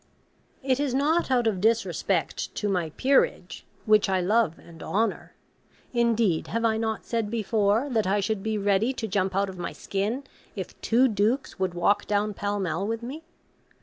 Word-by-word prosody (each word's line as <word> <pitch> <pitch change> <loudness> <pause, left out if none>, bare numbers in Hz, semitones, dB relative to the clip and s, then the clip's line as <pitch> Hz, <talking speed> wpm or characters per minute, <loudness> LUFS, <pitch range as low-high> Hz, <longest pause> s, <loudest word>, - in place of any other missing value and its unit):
It 260 0 +1
is 280 -3 0
not 305 +5 +2
out 250 -2 +2
of 205 -5 0
disrespect 225 +2 0
to 210 - -2
my 180 -5 0
'Peerage,' 255 -10 +1 0.2
which 215 -2 +4
I 190 -1 +2
love 195 -2 +2
and 165 -1 -15
honour, 215 +7 -2 0.6
(indeed, 230 -7 +2
have 230 0 -1
I 220 -1 +2
not 220 -1 -2
said 230 -3 -1
before, 220 +2 +1
that 220 -5 +1
I 200 +2 +2
should 205 0 -1
be 220 +1 -1
ready 205 +5 +2
to 225 -3 -4
jump 190 -2 0
out 200 +1 +2
of 185 -2 -8
my 170 - -4
skin 210 +7 -2 0.3
if - - -7
two 245 +3 +4
Dukes 225 +4 0
would 185 -2 -1
walk 200 +4 +2
down 210 0 0
Pall 205 +1 -2
Mall 185 +1 -2
with 230 +1 -3
me?) 275 +7 -6
215 Hz, 180 wpm, -26 LUFS, 195-230 Hz, 0.6 s, which